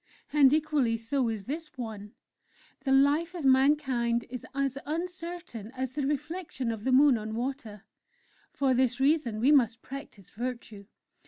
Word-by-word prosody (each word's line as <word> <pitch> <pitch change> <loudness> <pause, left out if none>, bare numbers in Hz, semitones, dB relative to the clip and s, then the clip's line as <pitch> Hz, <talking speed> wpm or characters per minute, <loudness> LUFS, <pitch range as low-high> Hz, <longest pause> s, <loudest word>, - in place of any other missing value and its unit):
And 280 -3 +6
equally 295 -6 +1
so 235 +2 -1
is 220 -3 -4
this 305 - -6
one: 215 -4 -7 0.7
'_The 270 0 +6
life 325 +5 0
of 330 -5 -4
mankind 260 -3 +3
is 250 -2 -6
as 275 -1 0
uncertain 335 - -5
as 260 -1 -3
the 275 0 -2
reflection 295 -3 -3
of 220 -1 -6
the 260 - +2
Moon 265 -2 +5
on 215 +1 -5
water; 235 -4 -5 0.7
for 270 -2 +1
this 250 -1 +1
reason 270 -6 +2
we 260 +6 +4
must 235 -5 +3
practise 270 - -9
Virtue! 235 -4 -6
265 Hz, 150 wpm, -29 LUFS, 230-295 Hz, 0.7 s, And